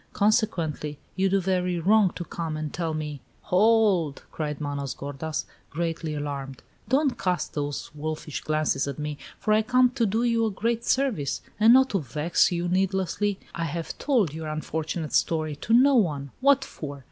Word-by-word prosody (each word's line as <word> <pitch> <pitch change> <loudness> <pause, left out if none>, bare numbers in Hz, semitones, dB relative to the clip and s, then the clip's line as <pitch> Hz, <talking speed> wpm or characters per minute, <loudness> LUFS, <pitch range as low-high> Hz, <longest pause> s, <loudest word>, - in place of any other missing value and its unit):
Consequently, 175 -9 0 0.2
you 190 0 +2
do 195 +1 +3
very 180 -1 0
wrong 200 +3 +4
to 175 - -5
come 165 -2 -4
and 155 -1 -4
tell 165 -2 -2
me 150 -3 -5
" - - -36
"Hold!" 195 -7 +3
cried 150 -2 -3
Manos 140 -2 -3
gordas, 145 +3 -4 0.2
greatly 165 -1 -3
alarmed. 140 -3 -5 0.3
"Don't 275 +1 +2
cast 180 -1 -1
those 145 -1 -3
wolfish 155 0 -4
glances 155 -3 0
at 140 - -4
me, 150 -1 -4 0.2
for 215 - +1
I 215 - +5
come 250 +2 +3
to 240 -3 +1
do 220 +4 0
you 230 -1 +2
a - - 0
great 230 +3 -1
service, 245 - 0 0.2
and 220 +2 +7
not 265 +1 +5
to 195 - +1
vex 150 +6 +1
you 175 0 -1
needlessly. 190 +2 0
I 165 - -2
have 165 +1 -4
told 230 - +2
your 160 0 -5
unfortunate 155 +1 -3
story 155 -2 +1
to 220 - -5
no 260 +5 +6
one. 150 - +1
What 275 0 +4
for? 145 - -7
170 Hz, 175 wpm, -26 LUFS, 150-215 Hz, 0.3 s, and